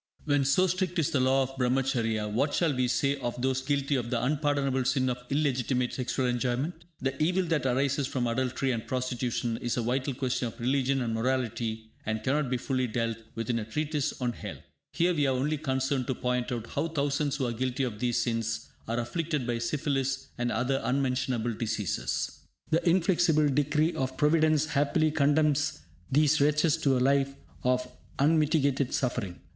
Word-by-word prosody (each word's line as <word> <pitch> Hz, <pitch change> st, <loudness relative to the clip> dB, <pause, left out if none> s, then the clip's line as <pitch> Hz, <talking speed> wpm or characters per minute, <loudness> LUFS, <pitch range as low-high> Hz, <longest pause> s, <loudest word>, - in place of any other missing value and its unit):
When 145 Hz, -2 st, +2 dB
so 140 Hz, +8 st, +4 dB
strict 185 Hz, 0 st, -1 dB
is 160 Hz, -5 st, +1 dB
the 140 Hz, -, +2 dB
law 130 Hz, +1 st, +3 dB
of 135 Hz, +1 st, -6 dB
Brahmacharya, 125 Hz, -4 st, +1 dB
what 130 Hz, +8 st, 0 dB
shall 165 Hz, -4 st, +2 dB
we 125 Hz, 0 st, +1 dB
say 140 Hz, +3 st, +1 dB
of 120 Hz, -2 st, -4 dB
those 130 Hz, +1 st, 0 dB
guilty 140 Hz, +1 st, 0 dB
of 120 Hz, -3 st, -2 dB
the 120 Hz, -2 st, 0 dB
unpardonable 140 Hz, -1 st, +1 dB
sin 130 Hz, 0 st, +1 dB
of 125 Hz, 0 st, -6 dB
illegitimate 130 Hz, -3 st, 0 dB
sexual 130 Hz, 0 st, -1 dB
enjoyment? 130 Hz, +7 st, -1 dB, 0.2 s
The 135 Hz, +2 st, -2 dB
evil 180 Hz, +4 st, +2 dB
that 160 Hz, -6 st, 0 dB
arises 135 Hz, +2 st, +1 dB
from 130 Hz, -3 st, -1 dB
adultery 130 Hz, +2 st, 0 dB
and 115 Hz, -3 st, -3 dB
prostitution 125 Hz, -2 st, -1 dB
is 120 Hz, +1 st, -2 dB
a 120 Hz, -, 0 dB
vital 130 Hz, +3 st, -1 dB
question 130 Hz, -2 st, -1 dB
of 115 Hz, -, -9 dB
religion 135 Hz, +1 st, +1 dB
and 115 Hz, -1 st, -2 dB
morality 115 Hz, -2 st, -2 dB
and 110 Hz, 0 st, -2 dB
cannot 140 Hz, +2 st, +1 dB
be 125 Hz, -, +1 dB
fully 130 Hz, +1 st, -1 dB
dealt 115 Hz, 0 st, -1 dB, 0.2 s
with 115 Hz, +1 st, -2 dB
in 115 Hz, -, 0 dB
a -, -, -3 dB
treatise 150 Hz, +5 st, -2 dB
on 125 Hz, -2 st, -1 dB
health. -, -, -8 dB, 0.3 s
Here 175 Hz, +2 st, +2 dB
we 145 Hz, -4 st, +2 dB
are 135 Hz, -, +2 dB
only 145 Hz, +4 st, 0 dB
concerned 130 Hz, -2 st, -1 dB
to 130 Hz, -, -1 dB
point 125 Hz, 0 st, -1 dB
out 120 Hz, -2 st, -3 dB
how 165 Hz, -, 0 dB
thousands 145 Hz, -2 st, 0 dB
who 140 Hz, -3 st, -1 dB
are 120 Hz, -, -1 dB
guilty 130 Hz, +3 st, -1 dB
of 115 Hz, -5 st, -3 dB
these 120 Hz, -1 st, 0 dB
sins 115 Hz, 0 st, -2 dB, 0.2 s
are 115 Hz, +1 st, -1 dB
afflicted 150 Hz, +3 st, -2 dB
by 120 Hz, -1 st, -1 dB
syphilis 135 Hz, +1 st, -1 dB
and 120 Hz, 0 st, -1 dB
other 125 Hz, +4 st, 0 dB
unmentionable 125 Hz, -3 st, 0 dB
diseases. 110 Hz, -3 st, -2 dB, 0.3 s
The 165 Hz, +2 st, +2 dB
inflexible 170 Hz, -4 st, +3 dB
decree 150 Hz, +4 st, +2 dB
of 130 Hz, 0 st, -3 dB
Providence 155 Hz, 0 st, +3 dB
happily 150 Hz, +1 st, +1 dB
condemns 150 Hz, -, +2 dB, 0.3 s
these 150 Hz, +2 st, +4 dB
wretches 150 Hz, +2 st, +3 dB
to 140 Hz, -5 st, +2 dB
a -, -, +1 dB
life 135 Hz, +1 st, +2 dB, 0.3 s
of 125 Hz, 0 st, +1 dB, 0.3 s
unmitigated 145 Hz, -3 st, +2 dB
suffering. 100 Hz, -8 st, -2 dB
130 Hz, 180 wpm, -29 LUFS, 125-145 Hz, 0.3 s, so